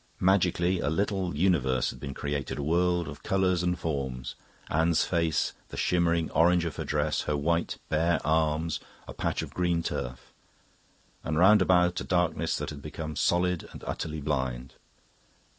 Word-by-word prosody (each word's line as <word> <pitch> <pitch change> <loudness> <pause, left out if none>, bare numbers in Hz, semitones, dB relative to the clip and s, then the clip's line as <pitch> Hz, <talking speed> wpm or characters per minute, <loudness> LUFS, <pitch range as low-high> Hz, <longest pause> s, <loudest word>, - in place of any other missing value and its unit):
Magically, 90 -1 +2
a - - 0
little 95 -1 -1
universe 70 -7 +2
had - - -12
been 70 -1 -6
created, 70 -2 -3
a 70 - -3
world 85 +2 +1
of 70 +1 -8
colours 95 -2 +1
and 90 0 0
forms 65 -6 -3 0.3
Anne's 80 +1 +2
face, 85 -2 0 0.2
the - - -8
shimmering 85 -2 +1
orange 85 +2 +4
of 80 - -4
her - - -2
dress, 75 0 0
her 75 - +1
white, 85 +3 0
bare 80 +2 +2
arms, 80 +1 +1 0.3
a - - -7
patch - - -2
of - - -9
green 90 -2 0
turf 60 -4 -5 0.9
and 80 0 -2
round 95 +4 +6
about 90 -1 +3
a - - -4
darkness 90 -2 0
that - - -4
had 70 -1 -8
become 75 +1 -6
solid 90 +2 +1
and - - -10
utterly 80 -1 -4
blind. 65 -3 -2
80 Hz, 160 wpm, -28 LUFS, 75-90 Hz, 0.9 s, round